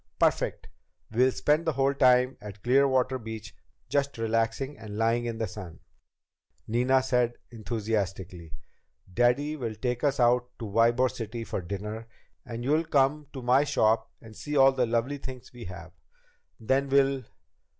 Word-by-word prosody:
"Perfect! -, -, +1 dB, 0.4 s
We'll 125 Hz, +4 st, +3 dB
spend 150 Hz, +5 st, +1 dB
the 160 Hz, -, +2 dB
whole 135 Hz, +1 st, +2 dB
time 125 Hz, -2 st, +4 dB
at 105 Hz, -1 st, -10 dB
Clearwater 130 Hz, 0 st, +3 dB
Beach 110 Hz, -3 st, -8 dB, 0.3 s
just 140 Hz, -2 st, -1 dB
relaxing 115 Hz, +5 st, -1 dB
and 105 Hz, -2 st, -8 dB
lying 115 Hz, +2 st, +1 dB
in 115 Hz, -1 st, -3 dB
the 110 Hz, -, -1 dB
sun," 90 Hz, -5 st, -9 dB, 0.9 s
Nina 125 Hz, +4 st, +2 dB
said 125 Hz, -2 st, +1 dB, 0.2 s
enthusiastically. 100 Hz, -7 st, -3 dB, 0.6 s
"Daddy 125 Hz, +7 st, +2 dB
will 115 Hz, -7 st, -4 dB
take 125 Hz, +3 st, -3 dB
us 140 Hz, -2 st, +1 dB
out 125 Hz, 0 st, +3 dB
to 115 Hz, -, -6 dB
Ybor 115 Hz, +4 st, +3 dB
City 115 Hz, 0 st, -6 dB
for 105 Hz, -, -4 dB
dinner 105 Hz, +5 st, -6 dB, 0.4 s
and 120 Hz, 0 st, -6 dB
you'll 155 Hz, +5 st, +2 dB
come 145 Hz, +1 st, +1 dB
to 130 Hz, -3 st, -7 dB
my 125 Hz, +3 st, +4 dB
shop 110 Hz, -5 st, +2 dB
and 110 Hz, -1 st, -13 dB
see 145 Hz, +8 st, -3 dB
all 135 Hz, 0 st, +7 dB
the 125 Hz, -2 st, 0 dB
lovely 120 Hz, +5 st, -1 dB
things 130 Hz, -3 st, -9 dB
we 120 Hz, -1 st, -9 dB
have. 90 Hz, -1 st, -9 dB, 0.7 s
Then 135 Hz, +5 st, +1 dB
we'll 135 Hz, 0 st, +3 dB
120 Hz, 150 wpm, -28 LUFS, 110-135 Hz, 0.9 s, all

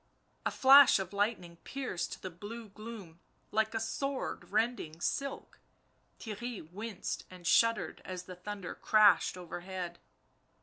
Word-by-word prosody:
A -, -, +2 dB
flash 275 Hz, +1 st, +8 dB
of 190 Hz, 0 st, -4 dB
lightning 200 Hz, -5 st, -1 dB
pierced 255 Hz, -5 st, -4 dB
the 185 Hz, -, -4 dB
blue 210 Hz, +6 st, -8 dB
gloom 205 Hz, -5 st, -10 dB, 0.3 s
like 220 Hz, +1 st, +1 dB
a -, -, +1 dB
sword 270 Hz, +5 st, -3 dB
rending 215 Hz, -7 st, 0 dB
silk; 275 Hz, +9 st, -3 dB, 0.6 s
Theirry 220 Hz, -4 st, -6 dB
winced 205 Hz, 0 st, -5 dB
and 180 Hz, -1 st, -13 dB
shuddered 230 Hz, +3 st, +3 dB
as 185 Hz, -1 st, -6 dB
the 185 Hz, 0 st, -9 dB
thunder 195 Hz, 0 st, -6 dB
crashed 215 Hz, -3 st, +4 dB
overhead. 175 Hz, 0 st, -6 dB
205 Hz, 125 wpm, -32 LUFS, 180-230 Hz, 0.6 s, flash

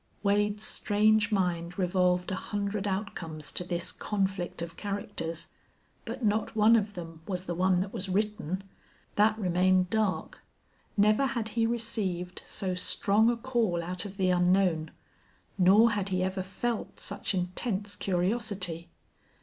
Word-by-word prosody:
Wade's 205 Hz, +1 st, +1 dB
strange 215 Hz, +1 st, +2 dB
mind 175 Hz, -3 st, 0 dB
revolved 180 Hz, -1 st, +1 dB
a -, -, 0 dB
hundred 205 Hz, +1 st, -2 dB
outcomes 170 Hz, -6 st, -4 dB
to -, -, +1 dB
this 175 Hz, -1 st, -2 dB
conflict 195 Hz, -3 st, -2 dB
of 170 Hz, 0 st, -7 dB
characters, 200 Hz, -5 st, -4 dB, 0.6 s
but 235 Hz, -, -4 dB
not 215 Hz, +2 st, 0 dB
one 220 Hz, +1 st, +6 dB
of 205 Hz, -2 st, +1 dB
them 165 Hz, -2 st, -8 dB
was 185 Hz, -2 st, -3 dB
the 175 Hz, -, -2 dB
one 180 Hz, +1 st, +2 dB
that 195 Hz, +1 st, -4 dB
was 190 Hz, +1 st, -4 dB
written. 200 Hz, -2 st, -1 dB, 0.5 s
That 215 Hz, +1 st, +3 dB
remained 185 Hz, -1 st, +2 dB
dark. 215 Hz, -3 st, -1 dB, 0.6 s
Never 215 Hz, +6 st, +4 dB
had 235 Hz, -4 st, -2 dB
he 225 Hz, +1 st, +1 dB
received 195 Hz, -6 st, -2 dB
so 190 Hz, -2 st, -3 dB
strong 205 Hz, +4 st, +3 dB
a 240 Hz, -, +1 dB
call 230 Hz, -9 st, 0 dB
out 180 Hz, +1 st, -4 dB
of 200 Hz, -1 st, -8 dB
the 185 Hz, -2 st, +2 dB
unknown, 180 Hz, -2 st, +3 dB, 0.7 s
nor 205 Hz, +5 st, +6 dB
had 200 Hz, -2 st, -1 dB
he 185 Hz, -1 st, 0 dB
ever 190 Hz, 0 st, -1 dB
felt 220 Hz, +5 st, -3 dB
such 200 Hz, 0 st, -3 dB
intense 195 Hz, +3 st, -2 dB
curiosity. 185 Hz, -3 st, -1 dB
195 Hz, 140 wpm, -29 LUFS, 180-210 Hz, 0.7 s, one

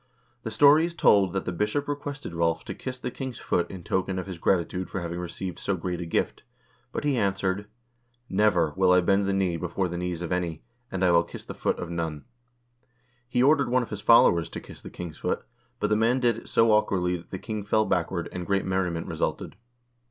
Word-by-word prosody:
The 115 Hz, -, -4 dB
story 145 Hz, +7 st, +6 dB
is 170 Hz, -, -9 dB
told 100 Hz, -, +4 dB
that 95 Hz, -, -2 dB
the -, -, -2 dB
bishop 105 Hz, +10 st, -1 dB
requested 145 Hz, -2 st, -5 dB
Rolv 85 Hz, -1 st, 0 dB
to -, -, -5 dB
kiss 130 Hz, -1 st, -6 dB
the 125 Hz, -, -5 dB
king's 130 Hz, -1 st, -6 dB
foot 85 Hz, -, 0 dB
in 95 Hz, -3 st, -8 dB
token 95 Hz, +2 st, -1 dB
of 95 Hz, -, -3 dB
his 95 Hz, -3 st, -7 dB
gratitude 90 Hz, +1 st, 0 dB
for -, -, -3 dB
having 85 Hz, 0 st, -4 dB
received 90 Hz, +1 st, -5 dB
so 100 Hz, -, -1 dB
great 90 Hz, +1 st, -3 dB
a 85 Hz, -, -5 dB
gift. -, -, -1 dB, 0.5 s
But -, -, -3 dB
he 145 Hz, -3 st, +1 dB
answered: 100 Hz, 0 st, 0 dB, 0.3 s
" 120 Hz, 0 st, -42 dB, 0.2 s
Never 85 Hz, -8 st, +3 dB
will 95 Hz, -1 st, +4 dB
I 90 Hz, -, +5 dB
bend 100 Hz, +2 st, +2 dB
the -, -, +1 dB
knee 95 Hz, -3 st, +1 dB
before 90 Hz, +2 st, -2 dB
the 85 Hz, 0 st, -4 dB
knees 90 Hz, -1 st, -3 dB
of 85 Hz, -, -5 dB
any, 85 Hz, -3 st, -2 dB, 0.3 s
and 95 Hz, -1 st, 0 dB
I 90 Hz, -, +4 dB
will 85 Hz, 0 st, +5 dB
kiss 85 Hz, -, -10 dB
the -, -, -7 dB
foot -, -, -1 dB
of 85 Hz, -, -5 dB
none." 80 Hz, -3 st, -3 dB, 1.0 s
He 125 Hz, 0 st, +2 dB
ordered 140 Hz, -2 st, +4 dB
one 125 Hz, 0 st, +3 dB
of 115 Hz, -, -10 dB
his 105 Hz, -1 st, -5 dB
followers 85 Hz, -8 st, +5 dB
to -, -, -6 dB
kiss -, -, -13 dB
the -, -, -9 dB
king's 85 Hz, -3 st, -8 dB
foot, -, -, -1 dB, 0.4 s
but 105 Hz, -, 0 dB
the -, -, +5 dB
man 115 Hz, +4 st, +2 dB
did 120 Hz, -3 st, +2 dB
it 115 Hz, -, -10 dB
so 115 Hz, -1 st, +4 dB
awkwardly 95 Hz, -4 st, +2 dB
that 85 Hz, -, -15 dB
the 95 Hz, -, -5 dB
king 110 Hz, +1 st, -5 dB
fell 110 Hz, +2 st, +2 dB
backward, 90 Hz, -2 st, -1 dB
and 90 Hz, -1 st, -5 dB
great 100 Hz, -1 st, +1 dB
merriment 90 Hz, -3 st, -1 dB
resulted. -, -, -3 dB
95 Hz, 225 wpm, -26 LUFS, 85-110 Hz, 1.0 s, story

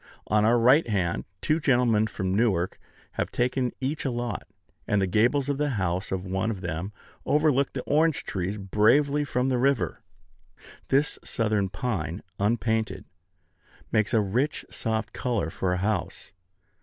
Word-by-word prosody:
On 105 Hz, +1 st, +2 dB
our 115 Hz, +3 st, +4 dB
right 125 Hz, +4 st, +5 dB
hand, 90 Hz, -5 st, 0 dB, 0.2 s
two 155 Hz, +1 st, +1 dB
gentlemen 120 Hz, -7 st, +3 dB
from 95 Hz, -3 st, -3 dB
Newark 95 Hz, -5 st, +1 dB, 0.3 s
have -, -, -2 dB
taken 125 Hz, 0 st, 0 dB
each 140 Hz, +4 st, -2 dB
a 135 Hz, -, 0 dB
lot; 120 Hz, -4 st, -3 dB, 0.4 s
and 100 Hz, -3 st, +2 dB
the 95 Hz, -, +2 dB
gables 120 Hz, +9 st, +2 dB
of 140 Hz, -1 st, -1 dB
the 150 Hz, 0 st, +1 dB
house 90 Hz, 0 st, -1 dB
of 95 Hz, 0 st, -2 dB
one 95 Hz, +4 st, -1 dB
of 100 Hz, -5 st, -4 dB
them 90 Hz, +2 st, -4 dB, 0.3 s
overlook 145 Hz, -3 st, +2 dB
the 130 Hz, -, -4 dB
orange 160 Hz, +1 st, +2 dB
trees 95 Hz, +2 st, -3 dB
bravely 120 Hz, +9 st, +3 dB
from 130 Hz, -2 st, 0 dB
the 125 Hz, -2 st, +1 dB
river. 125 Hz, -, +1 dB, 0.9 s
This 140 Hz, +2 st, +1 dB
southern 105 Hz, -4 st, 0 dB
pine, 95 Hz, -, -3 dB, 0.2 s
unpainted, 110 Hz, -2 st, 0 dB, 0.9 s
makes 110 Hz, -1 st, +2 dB
a 115 Hz, -3 st, +4 dB
rich, 120 Hz, +9 st, -1 dB
soft 110 Hz, -1 st, -2 dB
color 115 Hz, -, -1 dB
for 95 Hz, +1 st, -1 dB
a 90 Hz, -, +1 dB
house. 95 Hz, -2 st, -2 dB
110 Hz, 155 wpm, -26 LUFS, 95-130 Hz, 0.9 s, right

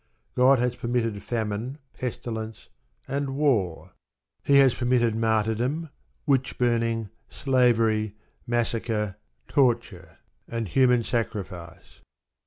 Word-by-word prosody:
God 130 Hz, +2 st, +5 dB
has 125 Hz, 0 st, 0 dB
permitted 115 Hz, -4 st, -1 dB
famine, 115 Hz, +3 st, -3 dB, 0.2 s
pestilence, 110 Hz, -3 st, -5 dB, 0.4 s
and 140 Hz, 0 st, -2 dB
war. 115 Hz, -, 0 dB, 0.5 s
He 140 Hz, -, +5 dB
has 135 Hz, -3 st, +6 dB
permitted 120 Hz, -2 st, +1 dB
martyrdom, 115 Hz, +7 st, 0 dB, 0.3 s
witch 135 Hz, -4 st, +1 dB
burning, 115 Hz, -3 st, 0 dB, 0.2 s
slavery, 115 Hz, -5 st, +2 dB, 0.3 s
massacre, 115 Hz, -3 st, -1 dB, 0.3 s
torture, 120 Hz, -8 st, 0 dB, 0.3 s
and 115 Hz, -2 st, -3 dB
human 125 Hz, +3 st, +3 dB
sacrifice. 95 Hz, -8 st, -5 dB
120 Hz, 90 wpm, -26 LUFS, 110-125 Hz, 0.5 s, has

